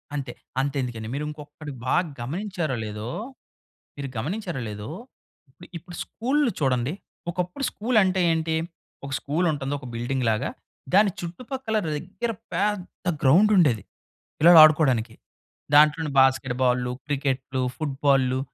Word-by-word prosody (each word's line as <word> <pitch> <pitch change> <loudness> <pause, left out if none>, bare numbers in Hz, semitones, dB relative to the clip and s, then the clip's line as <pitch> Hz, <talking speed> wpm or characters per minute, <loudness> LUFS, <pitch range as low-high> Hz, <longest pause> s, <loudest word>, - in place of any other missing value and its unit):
అంతే. 135 -4 -4 0.3
అంతెందుకండి, 125 -5 -3
మీరు 145 +2 -2
ఇంకొక్కటి 150 0 -9
బాగా 175 +8 +2 0.2
గమనించారో 165 - -3
లేదో, 105 +2 -5 0.9
మీరు 140 -1 -4
గమనించారో 170 - -3
లేదో, 105 +4 -7 0.6
ఇప్పుడు 175 +6 -15
ఇప్పుడు 175 +2 -11
స్కూల్లు 265 +2 0
చూడండి. 130 -1 +1 0.4
ఒకప్పుడు 180 +9 -3
స్కూల్ 230 +2 0
అంటే 185 0 +1
ఏంటి? 160 0 0 0.5
ఒక 140 - -7
స్కూల్ 155 +5 -1
ఉంటుంది, 140 -2 -3
ఒక 130 - -11
బిల్డింగ్ 120 +2 -2
లాగా, 110 -1 0 0.4
దాని 200 0 +5
చుట్టుపక్కల 220 +7 -4 0.2
దగ్గర 190 +9 -4 0.2
పెద్ద 200 -3 -2 0.2
గ్రౌండ్ 180 +11 +6
ఉండేది, 135 - +3 0.6
పిల్లలాడుకోడానికి. 155 -8 +7 0.6
దాంట్లోనే 150 +1 +5
బాస్కెట్‌ 130 -1 +3
బాల్లు, 125 0 +1
క్రికెట్లు, 135 -2 -1
ఫుట్ 145 -4 -3
బాల్లు, 130 -2 +3
150 Hz, 120 wpm, -25 LUFS, 130-180 Hz, 0.9 s, పిల్లలాడుకోడానికి